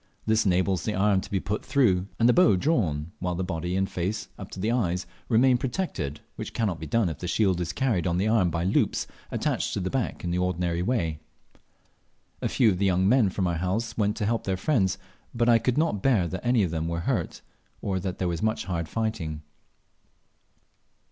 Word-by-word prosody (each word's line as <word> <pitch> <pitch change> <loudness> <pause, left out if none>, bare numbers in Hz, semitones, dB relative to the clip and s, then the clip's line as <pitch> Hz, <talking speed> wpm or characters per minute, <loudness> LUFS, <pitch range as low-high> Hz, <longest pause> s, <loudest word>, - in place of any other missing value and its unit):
This 110 -1 +2
enables 95 -1 +2
the 105 - -1
arm 100 0 +3
to - - -10
be 100 - 0
put 105 +3 -3
through 110 -10 +2
and 115 - +4
the 120 - +6
bow 180 - +5
drawn, 85 - 0
while 90 -1 -2
the 95 - -2
body 90 0 -3
and 95 0 +1
face, 95 +4 -3
up - - -9
to - - -9
the 110 +4 0
eyes, 90 -7 0 0.2
remain 125 +2 +4
protected, 120 - -3 0.2
which - - -6
cannot 100 -7 0
be - - -6
done 115 -4 +2
if 80 - -4
the 90 - -4
shield 95 -1 +2
is 85 - -2
carried 110 -10 0
on 85 0 +1
the 100 +4 +1
arm 110 -5 +3
by 85 0 -2
loops 95 - +1 0.2
attached - - -1
at 95 - -1
the 95 - -2
back 130 -4 -2
in 85 - -2
the 90 - 0
ordinary 90 -1 0
way. 90 -8 -1 1.2
A - - 0
few 115 -5 +4
of 90 - -2
the 100 - +2
young 95 0 +2
men 115 -2 +4
from 95 0 -1
our 85 -2 0
house 110 +6 -2
went 105 -1 0
to 105 - -1
help 115 +2 0
their 95 -1 0
friends, 95 -4 +1 0.4
but 120 0 +2
I 115 -1 +6
could 125 +2 0
not 155 -11 +1
bear 110 -9 +3
that 95 +2 -5
any 120 -3 +3
of 90 - -1
them 80 0 -2
were 85 0 -2
hurt, - - -2 0.4
or 95 -2 -2
that 90 0 -4
there 90 - -1
was 85 -2 -2
much 110 0 0
hard 85 -4 -3
fighting. 95 -9 -3
95 Hz, 220 wpm, -26 LUFS, 90-115 Hz, 1.2 s, the